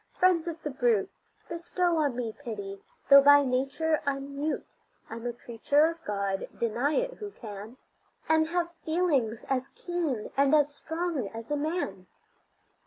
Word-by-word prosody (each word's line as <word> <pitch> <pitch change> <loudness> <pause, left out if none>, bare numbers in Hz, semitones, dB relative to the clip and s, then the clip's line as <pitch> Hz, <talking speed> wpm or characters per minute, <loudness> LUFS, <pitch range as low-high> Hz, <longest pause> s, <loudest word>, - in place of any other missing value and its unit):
friends 355 -2 +3
of 335 -1 -4
the 295 - -3
brute! 240 -6 +1 0.4
Bestow 340 0 0
on 290 -5 +1
me 235 -3 -3
pity. 205 -7 -7 0.3
Though 280 0 +10
by 285 +1 +7
nature 275 +5 0
I'm 280 -1 -3
mute, 300 +2 -2 0.5
I'm 230 +1 -5
a - - -1
creature 240 +6 +2
of 330 0 -3
God 200 -1 -2
deny 235 +6 0
it - - -1
who 415 -1 -5
can 215 - -9 0.5
And 315 0 +3
have 345 0 -1
feelings 295 -10 0
as 265 0 0
keen 330 -11 -3
and 275 +2 +4
as 295 -1 +3
strong 320 - -3
as 225 +5 -8
a - - +2
man. 290 - -3
280 Hz, 155 wpm, -28 LUFS, 235-320 Hz, 0.5 s, Though